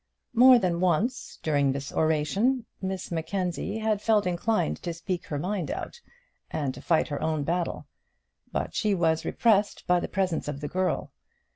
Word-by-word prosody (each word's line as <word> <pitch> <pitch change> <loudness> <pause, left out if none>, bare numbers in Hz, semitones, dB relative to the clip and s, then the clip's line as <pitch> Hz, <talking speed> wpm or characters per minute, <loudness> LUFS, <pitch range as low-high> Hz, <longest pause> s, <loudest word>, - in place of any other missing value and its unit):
More 250 +2 +8
than 180 -6 0
once 185 +8 0
during 145 -3 +2
this 140 +1 -5
oration 195 - +1 0.2
Miss 190 -1 -4
Mackenzie 175 +4 -2
had 215 -2 0
felt 215 -3 +3
inclined 175 - 0
to 170 -1 -4
speak 175 +1 -4
her 145 - -3
mind 180 +1 -2
out, 480 - -5 0.5
and 145 -4 -2
to - - -10
fight 160 -2 +2
her 145 - -3
own 155 -2 0
battle; 170 +3 -2 0.7
but - - -2
she 210 -3 +1
was 160 -2 +1
repressed 210 -3 +2
by 180 0 +3
the - - -3
presence 185 -6 -1
of 145 -1 -4
the 145 - -4
girl. 185 +4 -1
180 Hz, 165 wpm, -27 LUFS, 155-205 Hz, 0.7 s, More